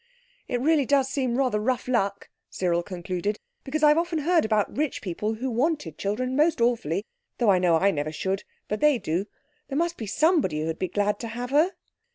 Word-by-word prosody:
"It 245 - -1
really 295 -2 +3
does 275 -2 +3
seem 260 -4 -1
rather 255 -6 +1
rough 250 +3 -1
luck," 200 -5 -1 0.2
Cyril 175 -2 0
concluded, 180 +3 -3 0.3
"because 310 +3 -3
I've 300 +1 +6
often 340 -1 -1
heard 330 -1 +2
about 215 -2 0
rich 300 0 -1
people 210 +4 -3
who 255 +3 -3
wanted 295 +6 -1
children 250 +6 -1
most 315 +3 +3
awfully—though 220 0 0
I 185 - +4
know 175 -2 +3
I 195 +5 +3
never 150 -3 -2
should—but 195 +5 -4
they 300 -3 +4
do. 185 -1 -2 0.4
There 275 - -3
must 340 +1 0
be 220 - -5
somebody 245 - +2
who'd 160 0 -3
be 185 - 0
glad 205 +3 0
to 235 - -5
have 245 +2 -5
her." 315 +7 +3
235 Hz, 190 wpm, -26 LUFS, 195-285 Hz, 0.4 s, I've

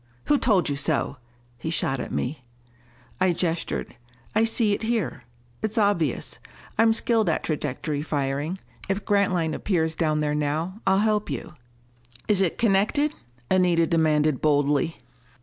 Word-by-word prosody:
"Who 290 -1 +3
told 205 -7 +3
you 145 - 0
so?" 140 0 0 0.4
he 160 - -4
shot 135 -4 0
at - - -5
me. 130 +1 -3 0.8
I 185 -1 +3
gestured. 165 -5 -2 0.4
"I 225 - +4
see 225 -2 +2
it - - -2
here. 225 - -2 0.4
It's 220 0 -2
obvious: 200 - +1 0.4
I'm 225 +1 +5
skilled 225 -3 +2
at 160 - 0
trajectory 150 -1 -2
firing. 145 +3 -2 0.3
If 195 +1 -1
Grantline 185 -6 +2
appears 160 -4 0
down 155 -2 0
there 150 -1 0
now, 155 +7 -2
I'll 190 - +5
help 210 -3 +1
you." 135 -5 -5 0.7
"Is 205 -2 +3
it 180 -4 +1
connected?" 230 +8 +2 0.4
Anita 180 -3 +4
demanded 155 -3 +2
boldly. 145 +2 +2
170 Hz, 140 wpm, -25 LUFS, 150-205 Hz, 0.8 s, I'm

